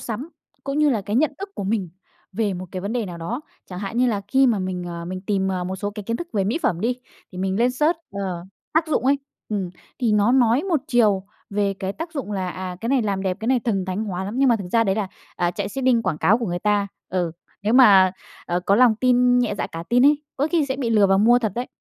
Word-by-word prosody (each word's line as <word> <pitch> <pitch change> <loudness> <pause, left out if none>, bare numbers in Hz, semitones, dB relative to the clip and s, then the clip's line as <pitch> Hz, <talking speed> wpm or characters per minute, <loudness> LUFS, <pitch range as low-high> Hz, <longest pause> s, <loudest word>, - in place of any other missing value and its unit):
sắm 240 +7 -5 0.4
cũng 275 +1 -2
như 300 -1 +4
là 230 -5 +1
cái 205 +3 -2
nhận 295 +2 +2
thức 395 +1 -5
của 195 - -4
mình 200 -3 -1 0.4
về 205 -1 -1
một 185 +1 -6
cái 185 - -4
vấn 200 +3 -4
đề 235 -3 -1
nào 175 -2 -7
đó 220 - -4 0.3
chẳng 180 - -7
hạn 200 +3 -5
như 255 - +4
là 215 -5 0
khi 270 +4 +4
mà 230 -4 +2
mình, 185 -1 -3
ờ, 170 -1 -6
mình 185 +2 -5
tìm, 190 -1 0
ờ, 185 -2 -2
một 190 +1 -4
số 205 +2 -3
cái 210 0 -7
kiến 230 +3 -2
thức 345 - -6
về 200 -3 +1
mỹ 225 +11 0
phẩm 170 - +1
đi 240 +4 0 0.4
thì 180 - -8
mình 190 0 -1
lên 240 +2 +3
search, 300 +7 +1
ờ, 190 -4 -4 0.3
tác 320 +1 +2
dụng 300 - 0
ấy 280 +1 +4 0.3
ừm, 195 -4 -2 0.3
thì 235 -4 +1
nó 210 +3 +3
nói 250 +1 +4
một 345 -6 0
chiều 210 -6 +3 0.3
về 200 -1 0
cái 190 0 -4
tác 325 +8 -7
dụng 275 -9 -4
là, 190 -2 -2
à, 185 0 -6
cái 230 - -3
này 265 -1 +2
làm 200 -3 -1
đẹp, 185 -2 -1
cái 220 - -4
này 255 -2 +3
thần 200 -5 -1
thánh 190 +4 -3
hóa 190 -2 -3
lắm 205 - -5
nhưng 270 0 +4
mà 235 - +4
thực 195 -4 -7
ra 230 -1 +4
đấy 195 -2 +1
là, 205 -2 -2 0.3
à, 175 0 +1
chạy 195 +2 -4
seeding 250 0 +1
quảng 180 -7 -1
cáo 215 +7 +4
của 235 - -3
người 175 -1 -2
ta, 205 +1 +1 0.2
ừ, 175 -3 -1 0.3
nếu 210 +2 +1
mà, 195 -8 +7 0.3
ờ, 175 +1 0
có 195 +2 +2
lòng 245 -1 +6
tin 250 +1 +4
nhẹ 245 -4 +1
dạ - - -2
cả 165 - -7
tin 245 +3 +5
ấy 295 0 +3
có 290 +3 +1
khi 325 -5 +2
sẽ 265 -1 -2
bị 250 -4 -2
lừa 210 -3 +5
và 195 - +3
mua 230 +5 +5
thật 220 -5 -2
đấy. 245 +1 -3
210 Hz, 280 wpm, -22 LUFS, 190-245 Hz, 0.4 s, mà